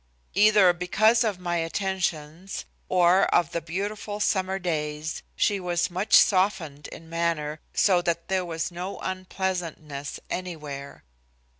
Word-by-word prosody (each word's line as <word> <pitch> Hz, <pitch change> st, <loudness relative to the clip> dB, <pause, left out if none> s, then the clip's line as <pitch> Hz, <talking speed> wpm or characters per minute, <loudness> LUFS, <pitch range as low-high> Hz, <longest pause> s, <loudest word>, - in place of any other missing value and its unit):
Either 205 Hz, -2 st, +6 dB
because 215 Hz, +7 st, +3 dB
of 210 Hz, -4 st, -1 dB
my 175 Hz, -1 st, -2 dB
attentions 175 Hz, -1 st, -3 dB, 0.2 s
or 180 Hz, +1 st, +5 dB
of 170 Hz, -4 st, +2 dB
the 170 Hz, -, -2 dB
beautiful 205 Hz, +5 st, -4 dB
summer 190 Hz, -2 st, +1 dB
days, 155 Hz, -3 st, -3 dB
she 205 Hz, -2 st, +2 dB
was 175 Hz, -1 st, -1 dB
much 185 Hz, +4 st, +2 dB
softened 185 Hz, -7 st, +3 dB
in 165 Hz, -, -11 dB
manner, 165 Hz, -2 st, -1 dB, 0.2 s
so 185 Hz, -3 st, +4 dB
that 170 Hz, -1 st, -2 dB
there 190 Hz, -1 st, 0 dB
was 165 Hz, 0 st, -3 dB
no 180 Hz, +3 st, -5 dB
unpleasantness 180 Hz, -6 st, -4 dB
anywhere. 150 Hz, -6 st, -6 dB
180 Hz, 125 wpm, -26 LUFS, 165-190 Hz, 0.2 s, Either